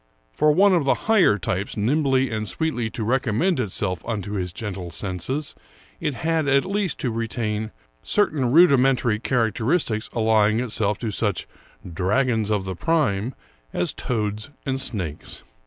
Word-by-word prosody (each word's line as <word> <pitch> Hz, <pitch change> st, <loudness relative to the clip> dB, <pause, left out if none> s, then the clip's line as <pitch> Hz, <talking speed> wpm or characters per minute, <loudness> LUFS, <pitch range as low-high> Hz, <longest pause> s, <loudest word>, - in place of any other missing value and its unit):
For 150 Hz, -, +3 dB
one 195 Hz, +5 st, +5 dB
of 170 Hz, -4 st, +3 dB
the 135 Hz, -, +3 dB
higher 210 Hz, -, +4 dB
types 95 Hz, +3 st, -3 dB
nimbly 135 Hz, +3 st, +2 dB
and 110 Hz, -2 st, -2 dB
sweetly 150 Hz, -8 st, -1 dB
to 110 Hz, -, -5 dB
recommend 130 Hz, -, +1 dB
itself 95 Hz, -5 st, -2 dB
unto 105 Hz, -4 st, -4 dB
his 90 Hz, -4 st, -2 dB
gentle 95 Hz, -2 st, -6 dB
senses, 100 Hz, -, -3 dB, 0.5 s
it 150 Hz, -4 st, -2 dB
had 160 Hz, +3 st, 0 dB
at 140 Hz, +2 st, +3 dB
least 195 Hz, -2 st, -1 dB
to 125 Hz, -, -1 dB
retain 110 Hz, -1 st, -2 dB, 0.3 s
certain 150 Hz, -, +1 dB
rudimentary 135 Hz, -8 st, +4 dB
charac 115 Hz, -2 st, +1 dB
teristics 115 Hz, -, 0 dB
allying 110 Hz, -1 st, +3 dB
it 125 Hz, -2 st, -3 dB
to 105 Hz, +1 st, -1 dB
such 105 Hz, 0 st, -1 dB, 0.2 s
" 90 Hz, -, -13 dB
dragons 115 Hz, -1 st, +1 dB
of 105 Hz, -3 st, 0 dB
the 95 Hz, -1 st, -4 dB
prime 125 Hz, -, 0 dB, 0.2 s
" -, -, -37 dB
as -, -, 0 dB
toads 110 Hz, -1 st, -2 dB, 0.2 s
and 135 Hz, -1 st, -1 dB
snakes. 95 Hz, -, -3 dB
115 Hz, 155 wpm, -23 LUFS, 105-140 Hz, 0.5 s, one